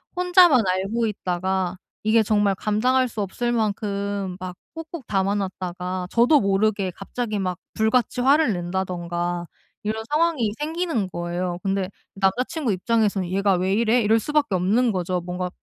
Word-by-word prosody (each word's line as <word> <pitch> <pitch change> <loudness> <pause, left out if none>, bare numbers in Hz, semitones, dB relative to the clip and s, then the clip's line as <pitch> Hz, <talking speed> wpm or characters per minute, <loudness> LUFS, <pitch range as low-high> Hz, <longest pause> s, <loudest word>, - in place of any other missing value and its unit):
혼자만 355 - +5
알고 195 +5 0
있다가 185 -2 -2 0.3
이게 220 +1 +4
정말 205 -2 +2
감당할 250 +6 +1
수 215 - -4
없을 240 +5 -2
만큼 200 -3 -2
막 180 -1 -6 0.2
꾹꾹 325 -1 -7
담아 195 0 +1
놨다가 185 -2 -3
저도 245 +6 +5
모르게 200 -1 +1
갑자기 210 +3 -4
막 185 -2 -2 0.2
불같이 230 +2 +1
화를 275 -2 +4
낸다든가 175 -1 -3 0.3
이런 220 +1 -3
상황이 300 -9 +2
생기는 320 - -1
거예요. 175 +1 -3
근데 195 -1 -1 0.2
남자 195 +5 +1
친구 315 -9 -2
입장에서는 200 -1 +1
'얘가 195 0 +2
왜 185 +2 0
이래?' 235 +2 +3
이럴 220 +2 +4
수밖에 295 -1 0
없는 210 +7 +2
거죠. 180 -2 -1
뭔가 180 0 -3
200 Hz, 325 characters per minute, -23 LUFS, 185-235 Hz, 0.3 s, 혼자만